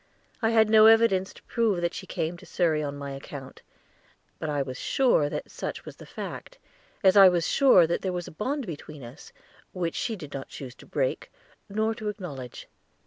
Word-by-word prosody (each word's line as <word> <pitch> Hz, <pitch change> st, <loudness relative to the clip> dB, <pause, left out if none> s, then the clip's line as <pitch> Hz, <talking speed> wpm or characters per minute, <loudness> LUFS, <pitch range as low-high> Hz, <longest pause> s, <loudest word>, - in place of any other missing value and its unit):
I 225 Hz, -, +2 dB
had 220 Hz, -1 st, +4 dB
no 215 Hz, 0 st, +7 dB
evidence 225 Hz, -4 st, +4 dB
to -, -, -17 dB
prove 225 Hz, -6 st, 0 dB
that 170 Hz, 0 st, -1 dB
she -, -, -7 dB
came 160 Hz, +2 st, -3 dB
to -, -, -14 dB
Surrey 160 Hz, -4 st, +1 dB
on 145 Hz, -1 st, -4 dB
my 140 Hz, -1 st, -6 dB
account; 135 Hz, 0 st, -9 dB, 0.8 s
but 155 Hz, -, -3 dB
I 145 Hz, -2 st, 0 dB
was 130 Hz, -1 st, -7 dB
sure 240 Hz, -, +2 dB
that -, -, -6 dB
such -, -, -6 dB
was -, -, -10 dB
the -, -, -13 dB
fact, -, -, -8 dB, 0.5 s
as 190 Hz, 0 st, +6 dB
I 195 Hz, -2 st, +9 dB
was 175 Hz, -3 st, 0 dB
sure 260 Hz, -11 st, +5 dB
that 170 Hz, -, -1 dB
there 190 Hz, -, -2 dB
was 175 Hz, -1 st, -4 dB
a -, -, -9 dB
bond 265 Hz, -, -3 dB
between 150 Hz, -4 st, -8 dB
us, 120 Hz, +6 st, -12 dB, 0.4 s
which 175 Hz, -4 st, -2 dB
she 230 Hz, -, -2 dB
did 150 Hz, -7 st, -10 dB
not 135 Hz, -1 st, -6 dB
choose 130 Hz, -3 st, -8 dB
to -, -, -15 dB
break, -, -, -2 dB, 0.4 s
nor 220 Hz, +2 st, 0 dB
to 215 Hz, -2 st, -4 dB
acknowledge. 145 Hz, -, -8 dB
180 Hz, 200 wpm, -27 LUFS, 145-220 Hz, 0.8 s, I